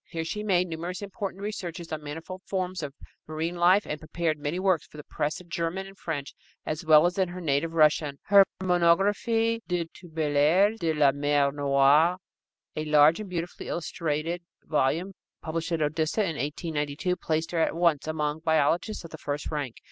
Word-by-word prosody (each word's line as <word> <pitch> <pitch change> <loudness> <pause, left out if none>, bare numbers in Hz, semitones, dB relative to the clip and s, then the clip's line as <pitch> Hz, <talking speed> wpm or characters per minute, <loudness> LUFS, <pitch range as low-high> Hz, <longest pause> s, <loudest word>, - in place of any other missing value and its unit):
Here 165 -1 -4
she 210 +6 -3
made 180 -4 +2
numerous 170 +4 -5
important 200 0 -5
researches 175 -5 -5
on 155 -1 -3
manifold 165 +6 -7
forms 185 -2 -2
of 145 -2 -6 0.3
marine 160 +3 -3
life 180 +4 +4
and 150 - -4
prepared 155 0 -2
many 145 +4 -2
works 185 -4 +1
for - - -15
the 150 - -8
press 150 +2 -3
in 180 - -14
German 170 +3 -2
and 195 0 -12
French, 145 -7 -5 0.3
as 155 +2 -3
well 155 0 +6
as 180 +2 0
in 190 - +3
her 180 +1 -7
native 165 0 0
Russian. 150 -2 +3
Her 200 -1 +7 0.2
Monographie 200 +6 +2
de 175 -2 -1
Turbellaries 160 +5 +1
de 165 -2 0
la 145 -2 +5
Mer 145 0 +1
Noire, 145 +4 +4 0.6
a 155 - -3
large 150 +2 +5
and 210 -3 -6
beautifully 175 -1 -5
illustrated 165 0 -2 0.2
volume 160 +6 0 0.3
published 165 +1 -3
at 165 -2 +1
Odessa 155 +6 0
in 195 - +1
1892, 150 +4 -2
placed 160 -1 -2
her 170 - 0
at 160 - +1
once 165 -4 +2
among 150 -1 -1
biologists 160 +6 +1
of 165 - -10
the 160 - -9
first 145 +1 -4
rank. 145 -6 -3
165 Hz, 180 wpm, -27 LUFS, 150-180 Hz, 0.6 s, Her